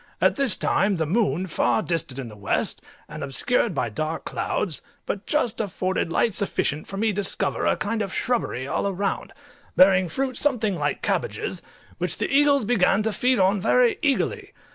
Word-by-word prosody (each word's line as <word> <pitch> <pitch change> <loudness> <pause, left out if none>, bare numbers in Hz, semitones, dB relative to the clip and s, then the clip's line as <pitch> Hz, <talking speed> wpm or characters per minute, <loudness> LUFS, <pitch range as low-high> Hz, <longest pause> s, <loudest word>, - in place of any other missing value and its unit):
At - - +3
this 275 -7 +2
time 195 +1 +1
the 165 -2 -1
moon, 190 +1 +1
far 175 - +1
distant 165 -6 -1
in 135 -3 -5
the 105 - -11
west, 100 -1 -1 0.3
and - - -7
obscured 180 - 0
by 125 -3 0
dark 155 +9 -4
clouds, 165 -7 -2 0.2
but 200 - -4
just 245 -8 +1
afforded 185 -4 -2
light 225 +5 +2
sufficient 155 -6 -2
for 195 - -7
me 220 +2 +1
to - - 0
discover 200 +1 0
a - - +2
kind 220 +1 -2
of 195 -2 -3
shrubbery 205 - -1
all 170 - -1
around, 200 +1 -2 0.4
bearing 185 -1 +5
fruit 260 +8 -2
something 230 -9 +1
like 145 -3 -2
cabbages, - - -2 0.4
which - - -1
the - - -1
eagles 280 -4 +4
began 210 -2 +3
to 220 0 -1
feed 250 +3 +2
on 195 0 +3
very 470 - +3
eagerly. 395 - 0
200 Hz, 180 wpm, -24 LUFS, 170-245 Hz, 0.4 s, bearing